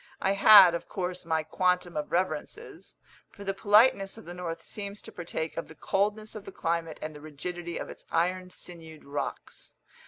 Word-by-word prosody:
I 190 - +1
had, 200 -2 +9
of 170 - -4
course, 180 -1 -4
my 160 -1 0
quantum 180 +2 0
of 150 -1 -3
reverences; 185 - -3 0.3
for 200 - -12
the 195 0 -1
politeness 210 0 +4
of 225 - -12
the 175 - -7
north 175 -2 -5
seems 200 0 -6
to - - -10
partake 165 -2 -5
of 165 - -3
the 160 - -13
coldness 210 +4 -1
of 210 -2 -8
the - - -8
climate 165 -3 -2
and 155 0 -5
the 150 - -11
rigidity 170 +3 -6
of - - -5
its - - -11
iron 180 +2 0
sinewed 165 -4 -9
rocks. 140 +1 -6
180 Hz, 185 wpm, -28 LUFS, 165-195 Hz, 0.3 s, had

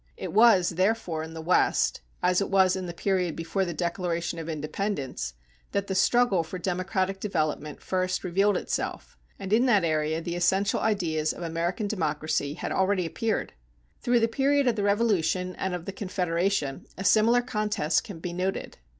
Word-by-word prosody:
It - - -5
was, 210 -5 +6
therefore, 185 -2 0
in 160 +1 -7
the 160 - -6
West, 180 +3 +2 0.2
as 180 +1 +3
it 200 - -1
was 190 -1 +4
in 185 -1 -4
the - - -4
period 180 -1 -1
before 165 +4 -1
the 175 - -3
Declaration 170 -1 -2
of 165 0 -6
Independence, 150 - -3 0.4
that 200 0 0
the 195 - -3
struggle 200 0 +3
for 165 +3 -6
democratic 185 +2 -1
development 155 -6 -2
first 185 0 -1
revealed 195 +3 +2
itself, - - -4 0.2
and 195 0 -4
in 240 +4 +4
that 210 -6 +4
area 155 -1 0
the 170 +1 -4
essential 190 +3 +2
ideas 165 -8 0
of - - -8
American 170 +5 -2
democracy 155 -6 -1
had - - -4
already 190 -1 +1
appeared. 220 +5 -2 0.5
Through 240 -1 +2
the 225 - +4
period 275 +4 +2
of 240 - +3
the 210 - -2
Revolution 190 -4 +1
and 190 -1 -2
of 175 -1 -7
the - - -4
Confederation 180 -6 -1
a 190 - -4
similar 230 +4 +4
contest 210 -9 0
can 200 -6 -8
be 170 +1 -5
noted. 185 - -3
185 Hz, 175 wpm, -27 LUFS, 165-200 Hz, 0.5 s, was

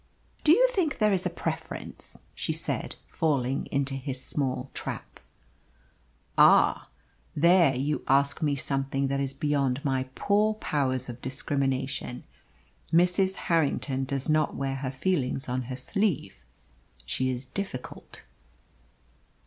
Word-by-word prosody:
"Do 305 - +6
you - - +6
think 335 - 0
there 210 -2 +3
is 185 -1 +1
a - - -2
preference?" 170 - -6
she - - -2
said, - - -2
falling 135 -4 0
into 140 0 -1
his 135 -1 -4
small 130 -1 -2
trap. - - -6 1.2
"Ah! - - +6 0.5
There 170 -2 +5
you 145 +4 -1
ask 140 +3 +2
me 145 -2 +2
something 135 0 -1
that 140 0 0
is 135 -1 -1
beyond 140 -1 0
my 130 -1 0
poor 210 +2 +2
powers 130 - -1
of 120 0 -8
discrimination. 135 -1 -2 0.7
Mrs. 180 +3 +3
Harrington 145 -4 +1
does 135 0 -2
not 155 0 +2
wear 135 -1 -2
her 135 -1 -3
feelings 135 -1 -1
on 125 0 -2
her 130 - -3
sleeve. 140 - -1 0.6
She 130 - -1
is 130 +1 -3
difficult." 135 -2 -7
140 Hz, 125 wpm, -28 LUFS, 130-165 Hz, 1.2 s, Do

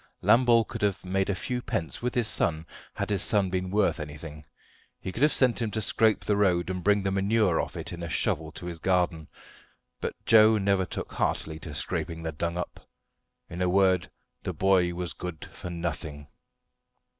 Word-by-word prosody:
Lambole 120 -1 +5
could - - -7
have 100 -2 0
made 95 +1 0
a 100 - +1
few 125 +5 -3
pence 85 -8 -3
with 125 0 -2
his 120 -3 +1
son 80 -6 0 0.3
had - - -3
his 100 -3 +1
son 100 -3 +2
been 90 0 -1
worth 100 -2 +1
anything. 75 0 -8 0.6
He 95 - -5
could 115 - -6
have 150 +1 +5
sent 125 -2 +3
him 115 - 0
to 110 - -2
scrape 110 -2 +2
the 105 - +2
road, 90 -3 +2
and 90 -1 -4
bring 105 -1 +3
the 95 - 0
manure 100 -2 +2
off - - -6
it - - -5
in 85 - -7
a 85 - -4
shovel - - 0
to - - -7
his 85 -2 -5
garden. 90 -3 +1 0.7
But - - -3
Joe 110 -1 +7
never 100 -2 +2
took - - -5
heartily 80 0 -1
to 75 -2 -7
scraping 80 +3 -3
the 80 - -2
dung 85 +3 -3
up. 90 - -5 0.7
In 90 +1 -6
a 90 - +2
word, 95 -1 +3 0.3
the - - -4
boy 95 -2 +3
was 85 -3 -3
good 90 -3 -7
for 90 - -7
nothing. 80 -4 -5
95 Hz, 195 wpm, -27 LUFS, 85-105 Hz, 0.7 s, Joe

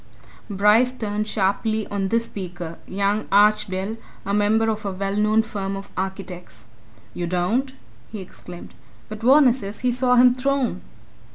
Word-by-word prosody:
Bryce 210 +5 +4
turned 215 -4 -3
sharply 215 +2 0
on 200 -1 -1
this 230 +3 0
speaker 175 -5 -7
young 200 +2 -1
Archdale, 205 0 +2 0.3
a 200 - -2
member 210 +2 +2
of 215 -1 -2
a 200 - -2
well 195 +1 -3
known 215 +1 +3
firm 195 -3 -4
of 195 0 -8
architects. 185 - -6 0.5
"You 175 - -3
don't?" 185 +10 0 0.4
he 220 - -6
exclaimed. 180 -1 -11 0.4
"But 215 0 -8
Varner 260 +1 +6
says 205 -5 -7
he 250 0 +2
saw 250 0 +2
him 250 0 +6
thrown!" 255 -6 -1
210 Hz, 150 wpm, -22 LUFS, 195-225 Hz, 0.5 s, Varner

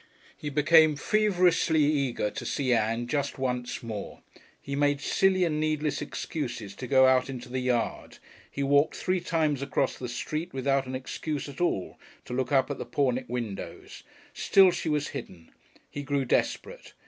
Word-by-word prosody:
He 150 - -5
became 155 +1 +5
feverishly 180 -4 +2
eager 140 -7 0
to 140 - -6
see 130 +1 0
Ann 115 +1 0
just 140 +2 -2
once 125 -2 -3
more. 110 -3 -7 0.4
He 140 - -5
made 145 0 +2
silly 185 +5 +2
and 155 -3 0
needless 155 -1 -1
excuses 120 - -5
to 125 - -6
go 130 0 +5
out 130 0 +3
into 125 -2 -7
the 130 +1 -2
yard, 125 -2 -2 0.3
he 140 - -3
walked 140 +2 +3
three 185 0 0
times 160 -5 0
across 140 -1 -1
the 125 - -5
street 155 +7 -4
without 135 0 +1
any 130 0 -3
excuse 145 +2 -4
at 140 +3 -8
all, 100 - -1 0.3
to - - -7
look 130 +1 -1
up 135 0 +3
at 145 - -5
the - - -4
Pornick 130 -3 0
windows. 115 -5 -6 0.3
Still 190 -2 +5
she 170 - -3
was 150 -1 0
hidden. 90 -11 -9 0.4
He 145 - -5
grew 140 -1 -1
desperate. - - -2
140 Hz, 170 wpm, -28 LUFS, 125-155 Hz, 0.4 s, became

